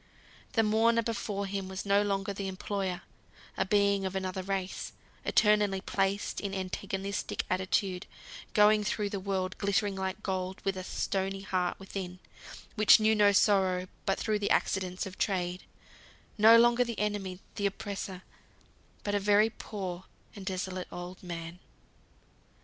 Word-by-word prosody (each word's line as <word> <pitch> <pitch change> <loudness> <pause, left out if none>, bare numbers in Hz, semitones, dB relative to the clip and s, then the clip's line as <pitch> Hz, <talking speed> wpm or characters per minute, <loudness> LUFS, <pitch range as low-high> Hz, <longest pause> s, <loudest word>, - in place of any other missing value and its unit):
The 225 - +3
mourner 230 +2 +3
before 205 -3 -2
him 195 -1 -3
was 190 +1 -5
no 200 0 +4
longer 200 -1 -1
the 195 0 -4
employer; 190 -1 -3 0.5
a 190 - 0
being 200 0 +3
of 190 0 -3
another 190 0 -2
race, 190 0 -3 0.3
eternally 210 -2 +3
placed 195 +1 -1
in 195 -1 -3
antagonistic 195 +1 -3
attitude; 185 0 0 0.5
going 210 0 +6
through 210 -1 -1
the 200 - -2
world 190 -1 -2
glittering 200 0 +1
like 190 +2 -3
gold, 185 -1 -2
with 195 -1 +1
a 185 - -5
stony 195 +1 -2
heart 185 -2 -1
within, 190 -2 -6 0.6
which 215 -1 +7
knew 215 0 +4
no 205 -1 +5
sorrow 190 -3 +3 0.2
but 195 - +2
through 215 -2 0
the 205 - -1
accidents 185 -1 0
of 190 0 -9
Trade; 180 -3 -1 0.7
no 225 +2 +8
longer 240 +1 +5
the 235 -2 -5
enemy, 205 -3 -2 0.2
the 200 - 0
oppressor, 195 -2 -5 0.8
but 205 - -2
a 205 - +2
very 210 +2 +4
poor 185 -5 -6 0.3
and 195 -2 -9
desolate 185 -1 -3
old 180 +1 -7
man. 170 -1 -7
195 Hz, 145 wpm, -30 LUFS, 185-205 Hz, 0.8 s, no